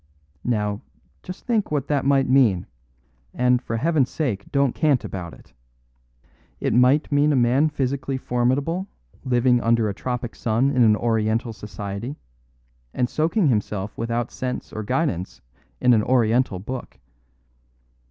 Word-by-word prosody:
Now, 105 Hz, -4 st, -1 dB, 0.4 s
just 180 Hz, +1 st, -9 dB
think 225 Hz, -5 st, 0 dB
what 145 Hz, -3 st, -1 dB
that 145 Hz, -3 st, 0 dB
might 135 Hz, -1 st, +3 dB
mean; 125 Hz, -9 st, +3 dB, 0.7 s
and, 125 Hz, 0 st, +2 dB
for 115 Hz, -, -3 dB
Heaven's 150 Hz, -1 st, +1 dB
sake, 115 Hz, -11 st, -3 dB
don't 140 Hz, -3 st, +2 dB
cant 145 Hz, -5 st, +2 dB
about 90 Hz, -3 st, -6 dB
it. -, -, -21 dB, 1.1 s
It -, -, 0 dB
might 125 Hz, +6 st, +3 dB
mean 145 Hz, +1 st, +3 dB
a -, -, +2 dB
man 130 Hz, +5 st, +3 dB
physically 135 Hz, -1 st, -2 dB
formidable 135 Hz, +9 st, 0 dB, 0.4 s
living 125 Hz, -1 st, +2 dB
under 115 Hz, -1 st, +2 dB
a -, -, -3 dB
tropic 125 Hz, +3 st, -4 dB
sun 120 Hz, +4 st, +1 dB
in 130 Hz, -3 st, +2 dB
an 110 Hz, -2 st, +6 dB
Oriental 115 Hz, 0 st, 0 dB
society, 105 Hz, +5 st, -6 dB, 0.8 s
and 125 Hz, -1 st, 0 dB
soaking 165 Hz, +2 st, +1 dB
himself 105 Hz, -3 st, -2 dB
without 115 Hz, +1 st, -2 dB
sense 125 Hz, -1 st, -5 dB
or 110 Hz, -, -4 dB
guidance 110 Hz, -, -2 dB, 0.4 s
in 125 Hz, -, +4 dB
an 110 Hz, -, +4 dB
Oriental 120 Hz, -2 st, +2 dB
Book. 125 Hz, +7 st, -7 dB
125 Hz, 140 wpm, -23 LUFS, 110-140 Hz, 1.1 s, an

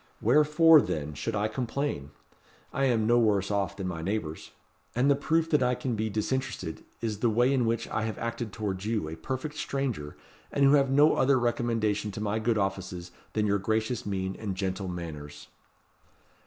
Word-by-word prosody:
Wherefore, 150 Hz, +5 st, +6 dB
then, 75 Hz, 0 st, -3 dB
should 110 Hz, +10 st, -3 dB
I 105 Hz, +1 st, +1 dB
complain? 120 Hz, -, -3 dB, 0.6 s
I 135 Hz, +1 st, +1 dB
am 115 Hz, -4 st, +2 dB
no 120 Hz, +2 st, +4 dB
worse 105 Hz, -3 st, +2 dB
off 100 Hz, -4 st, -1 dB
than 95 Hz, -2 st, -3 dB
my 85 Hz, -3 st, -4 dB
neighbours. 85 Hz, -4 st, -3 dB, 0.5 s
And 130 Hz, +4 st, +3 dB
the -, -, +5 dB
proof 160 Hz, +3 st, +1 dB
that 150 Hz, -, +4 dB
I 125 Hz, 0 st, +2 dB
can 125 Hz, -1 st, -2 dB
be 110 Hz, +1 st, -1 dB
disinterested 110 Hz, -5 st, -3 dB, 0.2 s
is 110 Hz, -3 st, -2 dB
the 120 Hz, -, +2 dB
way 120 Hz, +5 st, +3 dB
in 125 Hz, -4 st, +2 dB
which 115 Hz, 0 st, -1 dB
I -, -, -1 dB
have 110 Hz, -, -4 dB
acted 115 Hz, -1 st, -4 dB
towards 100 Hz, -3 st, -3 dB
you, 110 Hz, -6 st, -1 dB
a 80 Hz, -, -5 dB
perfect 130 Hz, -, -5 dB
stranger, 125 Hz, -, -3 dB, 0.3 s
and 140 Hz, -, +3 dB
who 135 Hz, -, +6 dB
have 140 Hz, -2 st, +4 dB
no 145 Hz, +3 st, +5 dB
other 135 Hz, 0 st, +4 dB
recommendation 115 Hz, -3 st, 0 dB
to -, -, -6 dB
my 105 Hz, +1 st, -1 dB
good 110 Hz, 0 st, +1 dB
offices 95 Hz, -3 st, -3 dB, 0.2 s
than 105 Hz, -1 st, +1 dB
your 100 Hz, -1 st, +2 dB
gracious 110 Hz, +4 st, -1 dB
mien 95 Hz, -1 st, -3 dB
and 100 Hz, -4 st, -3 dB
gentle 95 Hz, 0 st, -2 dB
manners." 80 Hz, -5 st, -7 dB
110 Hz, 185 wpm, -28 LUFS, 95-125 Hz, 0.6 s, Wherefore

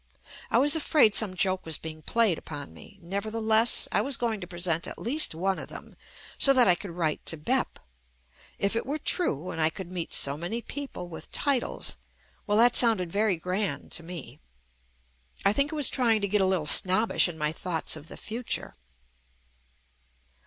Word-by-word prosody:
I -, -, +2 dB
was 290 Hz, +3 st, +5 dB
afraid 290 Hz, -8 st, +3 dB
some 200 Hz, -4 st, +3 dB
joke 185 Hz, 0 st, 0 dB
was 160 Hz, -2 st, 0 dB
being 155 Hz, -1 st, -9 dB
played 215 Hz, -1 st, +1 dB
upon 145 Hz, -2 st, -9 dB
me. -, -, -16 dB
Nevertheless, 220 Hz, +4 st, +2 dB
I -, -, +1 dB
was 275 Hz, -3 st, -1 dB
going 225 Hz, -4 st, -2 dB
to 175 Hz, -, -7 dB
present 175 Hz, -2 st, -2 dB
at -, -, -9 dB
least 275 Hz, -, +2 dB
one 190 Hz, +3 st, -1 dB
of -, -, -7 dB
them, -, -, -12 dB, 0.4 s
so 275 Hz, -, +6 dB
that 255 Hz, -4 st, +5 dB
I 180 Hz, -, +7 dB
could 195 Hz, +3 st, -6 dB
write 165 Hz, -3 st, -3 dB
to 160 Hz, -, +1 dB
"Bep." 150 Hz, -, -1 dB, 0.8 s
If 200 Hz, +2 st, -1 dB
it 230 Hz, -, -3 dB
were 290 Hz, +3 st, -2 dB
true 185 Hz, -, 0 dB
and 160 Hz, -, -4 dB
I 155 Hz, -, +3 dB
could 180 Hz, +2 st, -9 dB
meet 175 Hz, -3 st, -5 dB
so 140 Hz, +1 st, +1 dB
many 175 Hz, +9 st, -4 dB
people 265 Hz, -7 st, -7 dB
with 170 Hz, -, -11 dB
titles 275 Hz, -4 st, -1 dB, 0.2 s
— -, -, -36 dB
well 205 Hz, 0 st, +1 dB
that 240 Hz, +2 st, +5 dB
sounded 215 Hz, -8 st, +4 dB
very 205 Hz, -2 st, +1 dB
grand 180 Hz, -3 st, -3 dB
to -, -, -3 dB
me. 160 Hz, -6 st, -9 dB, 1.1 s
I 200 Hz, -, +4 dB
think 280 Hz, +4 st, +1 dB
I -, -, -5 dB
was 295 Hz, -3 st, +4 dB
trying 230 Hz, -4 st, +2 dB
to 200 Hz, -, 0 dB
get 205 Hz, +1 st, +1 dB
a 190 Hz, -, +2 dB
little 185 Hz, -5 st, 0 dB
snobbish 190 Hz, +9 st, +3 dB
in 170 Hz, -2 st, -8 dB
my 150 Hz, -1 st, -1 dB
thoughts 165 Hz, -1 st, -2 dB
of 155 Hz, 0 st, -11 dB
the -, -, -11 dB
future. 230 Hz, +2 st, -3 dB
195 Hz, 190 wpm, -27 LUFS, 165-230 Hz, 1.1 s, I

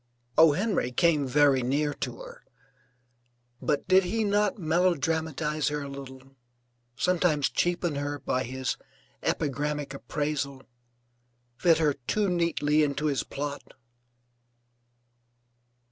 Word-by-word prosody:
O. 160 Hz, -2 st, +7 dB
Henry 195 Hz, -, 0 dB
came 150 Hz, -1 st, +2 dB
very 140 Hz, 0 st, +4 dB
near 145 Hz, +4 st, 0 dB
to -, -, -5 dB
her, -, -, -11 dB, 1.2 s
but 145 Hz, -1 st, -1 dB
did 190 Hz, +1 st, +5 dB
he 220 Hz, +5 st, -1 dB
not 205 Hz, 0 st, +1 dB
melodramatize 160 Hz, -3 st, 0 dB
her 150 Hz, 0 st, -1 dB
a -, -, -6 dB
little, 135 Hz, -1 st, -10 dB, 0.6 s
sometimes 170 Hz, -4 st, +1 dB
cheapen 175 Hz, -3 st, 0 dB
her 145 Hz, 0 st, -2 dB
by 130 Hz, -2 st, -1 dB
his 130 Hz, +1 st, -3 dB, 0.4 s
epigrammatic 145 Hz, -1 st, -2 dB
appraisal, 140 Hz, -1 st, -3 dB, 0.9 s
fit 165 Hz, +4 st, +4 dB
her 155 Hz, -3 st, +2 dB
too 210 Hz, -2 st, +1 dB
neatly 170 Hz, -4 st, +1 dB
into 150 Hz, 0 st, 0 dB
his 140 Hz, -4 st, +1 dB
plot? 145 Hz, 0 st, -6 dB
150 Hz, 110 wpm, -27 LUFS, 140-175 Hz, 1.2 s, O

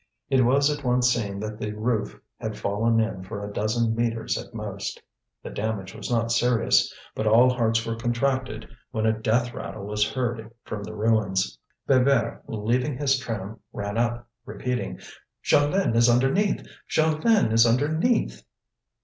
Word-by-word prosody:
It 130 Hz, -1 st, +4 dB
was 140 Hz, +4 st, +3 dB
at 145 Hz, -, -11 dB
once 125 Hz, 0 st, +3 dB
seen 100 Hz, -4 st, -3 dB
that 110 Hz, 0 st, -5 dB
the 105 Hz, -1 st, -3 dB
roof 110 Hz, 0 st, -2 dB, 0.2 s
had 110 Hz, -1 st, -4 dB
fallen 115 Hz, +3 st, +1 dB
in 110 Hz, -4 st, -1 dB
for 100 Hz, +1 st, -6 dB
a 105 Hz, -, -8 dB
dozen 110 Hz, +2 st, 0 dB
metres 115 Hz, -1 st, -1 dB
at -, -, -6 dB
most. 105 Hz, -3 st, -5 dB, 0.4 s
The -, -, -7 dB
damage 105 Hz, -2 st, -3 dB
was 110 Hz, -2 st, -7 dB
not 115 Hz, -1 st, +1 dB
serious. 120 Hz, -1 st, +3 dB, 0.2 s
But 110 Hz, -, -2 dB
all 120 Hz, +4 st, +6 dB
hearts 115 Hz, -2 st, +1 dB
were 115 Hz, -, -2 dB
contracted 120 Hz, 0 st, -1 dB, 0.2 s
when 110 Hz, 0 st, -2 dB
a 110 Hz, -, +4 dB
death 115 Hz, +2 st, 0 dB
rattle 100 Hz, 0 st, -6 dB
was 105 Hz, 0 st, 0 dB
heard 120 Hz, -4 st, -3 dB
from 105 Hz, -, -5 dB
the 110 Hz, -, -7 dB
ruins. 105 Hz, -, +1 dB, 0.3 s
Bébert, 130 Hz, -3 st, +3 dB
leaving 125 Hz, +5 st, -1 dB
his 135 Hz, -1 st, +2 dB
tram, 110 Hz, -4 st, -5 dB
ran 100 Hz, +1 st, -4 dB
up, 120 Hz, +1 st, -1 dB, 0.2 s
repeating: 125 Hz, +4 st, -4 dB, 0.4 s
"Jeanlin 145 Hz, -1 st, +2 dB
is 120 Hz, +1 st, +5 dB
underneath! 135 Hz, -, +2 dB, 0.2 s
Jeanlin 160 Hz, -, +3 dB
is 115 Hz, +1 st, +6 dB
underneath!" 155 Hz, -, +1 dB
115 Hz, 155 wpm, -25 LUFS, 110-125 Hz, 0.4 s, all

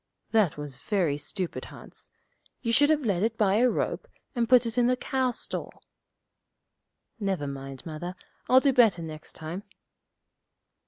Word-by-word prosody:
'That 215 Hz, -10 st, +3 dB
was 145 Hz, -3 st, -6 dB
very 170 Hz, +1 st, 0 dB
stupid, 175 Hz, +5 st, -4 dB
Hans. -, -, -7 dB, 0.5 s
You 230 Hz, -1 st, +1 dB
should 290 Hz, +4 st, +5 dB
have 300 Hz, -3 st, +2 dB
led 190 Hz, -5 st, +1 dB
it 225 Hz, +1 st, 0 dB
by 205 Hz, -1 st, +3 dB
a 250 Hz, +2 st, +5 dB
rope, -, -, -2 dB, 0.3 s
and 235 Hz, -3 st, 0 dB
put 250 Hz, -1 st, +7 dB
it 230 Hz, -1 st, -3 dB
in 245 Hz, -1 st, +4 dB
the 250 Hz, 0 st, +2 dB
cow 260 Hz, 0 st, 0 dB
stall.' 240 Hz, -, -5 dB, 1.4 s
'Never 195 Hz, -7 st, -1 dB
mind, 135 Hz, -1 st, -7 dB
Mother; 175 Hz, +3 st, -5 dB, 0.3 s
I'll 260 Hz, +1 st, +7 dB
do 275 Hz, -1 st, +3 dB
better 220 Hz, -9 st, +5 dB
next 155 Hz, -1 st, -7 dB
time.' 160 Hz, +4 st, -5 dB
205 Hz, 155 wpm, -28 LUFS, 160-245 Hz, 1.4 s, put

